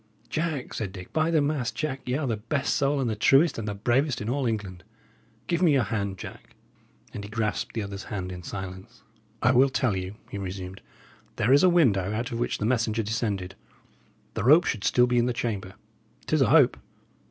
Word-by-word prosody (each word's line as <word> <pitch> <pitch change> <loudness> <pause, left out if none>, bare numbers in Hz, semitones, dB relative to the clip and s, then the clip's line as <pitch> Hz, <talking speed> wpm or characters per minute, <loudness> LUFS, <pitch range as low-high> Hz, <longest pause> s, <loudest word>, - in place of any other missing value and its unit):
"Jack," 155 -4 -2
said 105 -4 -3
Dick, 95 -2 -10
"by 160 +1 +2
the 160 -2 +3
mass, 140 -5 -1
Jack, 145 -3 -3
y' 125 - +1
are 155 - -2
the 115 -4 0
best 130 +6 -1
soul, 140 -1 +1
and 130 - 0
the 110 - -1
truest, 135 +7 +4
and 110 - -4
the 105 - -3
bravest 125 +5 +1
in 105 - -4
all 135 -1 0
England! 100 -5 -4 0.6
Give 170 0 -1
me 170 -5 +5
your 135 -3 +3
hand, 100 -4 -2
Jack." - - -10 0.6
And 100 - -6
he 100 - -8
grasped 110 0 -2
the 110 - -1
other's 100 -1 -7
hand 95 -4 -4
in 90 -1 -7
silence. 95 +1 -8 0.4
"I 125 - +5
will 130 +2 +5
tell 130 -5 +1
you," 95 +2 -4 0.2
he 100 - -4
resumed. 95 0 -6 0.5
"There 125 +6 +3
is 140 - +6
a 185 - +6
window, 105 - +3
out 120 +4 -3
of 115 - -3
which 120 - -1
the 105 - -2
messenger 115 -2 +1
descended; 100 -4 -2 0.8
the - - -3
rope 150 +9 +7
should 105 -4 -2
still 125 - +4
be 125 0 +2
in 120 - +2
the 125 - 0
chamber. 100 -6 -3 0.5
'Tis 155 -2 +1
a - - +4
hope." 145 -6 +5
115 Hz, 210 wpm, -26 LUFS, 100-135 Hz, 0.8 s, rope